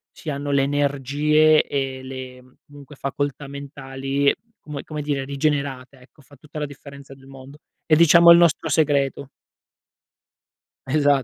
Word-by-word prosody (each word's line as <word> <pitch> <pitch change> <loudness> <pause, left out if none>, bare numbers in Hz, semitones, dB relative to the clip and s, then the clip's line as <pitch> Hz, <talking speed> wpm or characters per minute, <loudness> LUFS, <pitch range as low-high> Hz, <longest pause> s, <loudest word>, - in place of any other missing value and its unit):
ci 160 - -8
hanno 145 0 -4
le 140 - +3
energie 145 +2 +2
e 135 -1 -4
le 130 -1 -10
comunque, 145 0 -14
facoltà 140 +1 -4
mentali, 140 0 -2 0.3
come 150 -2 -8
come 150 -1 -6
dire, 140 -2 -2
rigenerate, 140 -2 -3
ecco. 135 +3 -21
Fa 145 +2 -19
tutta 150 0 -10
la 150 - -2
differenza 140 -1 -13
del 135 0 -19
mondo. 135 +1 -13 0.3
È, 155 - +4
diciamo, 170 +1 +7
il 170 - +9
nostro 165 -1 +2
segreto. 140 -3 0 1.6
Esa 145 -1 +2
140 Hz, 140 wpm, -22 LUFS, 135-150 Hz, 1.6 s, il